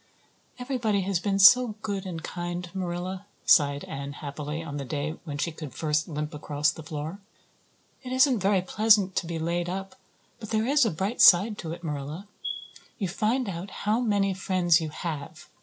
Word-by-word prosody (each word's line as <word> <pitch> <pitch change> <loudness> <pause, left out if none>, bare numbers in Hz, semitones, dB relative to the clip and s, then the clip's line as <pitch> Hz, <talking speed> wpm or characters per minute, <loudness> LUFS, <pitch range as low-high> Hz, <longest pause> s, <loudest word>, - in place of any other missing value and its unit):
"Everybody 245 -6 0
has 190 -1 0
been 195 +1 0
so 230 +3 +7
good 200 -2 -3
and 165 -3 -6
kind, 175 0 -4
Marilla," 185 +1 -4 0.2
sighed 145 -3 +4
Anne 140 +1 -6
happily, 150 +2 -5
on 145 -3 -6
the 140 - -4
day 145 +3 -3
when 145 -3 -5
she 165 +4 -1
could 155 -3 -9
first 155 -1 0
limp 150 0 -4
across 150 0 0
the - - -10
floor. 155 +4 -6 0.8
"It 255 - -8
isn't 260 -2 +4
very 195 -1 +2
pleasant 205 -1 +3
to 170 - 0
be 165 -1 -3
laid 170 +2 -1
up; 195 +1 -5 0.5
but 215 - -8
there 220 0 +1
is 280 -1 +4
a - - +2
bright 195 +8 -2
side 200 +4 +7
to 160 - -5
it, 170 +1 -8
Marilla. 150 +5 -5 0.7
You 195 -6 -2
find 225 +6 0
out 185 +1 -5
how 210 +4 -1
many 205 -5 +1
friends 180 -3 +2
you 160 - -3
have. 150 -2 -6
180 Hz, 180 wpm, -27 LUFS, 155-205 Hz, 0.8 s, so